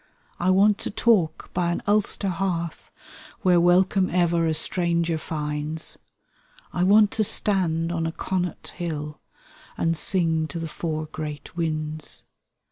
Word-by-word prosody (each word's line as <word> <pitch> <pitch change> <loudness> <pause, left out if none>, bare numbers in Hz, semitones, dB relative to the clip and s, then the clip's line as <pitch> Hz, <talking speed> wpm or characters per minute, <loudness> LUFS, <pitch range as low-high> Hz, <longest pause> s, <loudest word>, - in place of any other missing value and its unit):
I 175 - +1
want 200 +2 +4
to - - -3
talk 200 -8 +1
by 175 -1 0
an 175 - -3
Ulster 205 -1 +1
hearth. 170 -3 -3 0.5
Where 180 -2 +4
welcome 185 +2 +3
ever 170 -2 +2
a 160 - +1
stranger 170 0 +2
finds, 150 0 -2 0.7
I 175 - -1
want 205 +3 +5
to 220 - +1
stand 170 -6 +1
on 165 -1 -1
a - - -2
Connaught 180 0 -3
hill, 150 -4 -5 0.6
And 165 0 +1
sing 160 -2 +1
to 170 - -7
the 165 0 -4
four 155 -1 -4
great 150 -1 -7
winds. 155 -2 -3
170 Hz, 135 wpm, -24 LUFS, 160-185 Hz, 0.7 s, want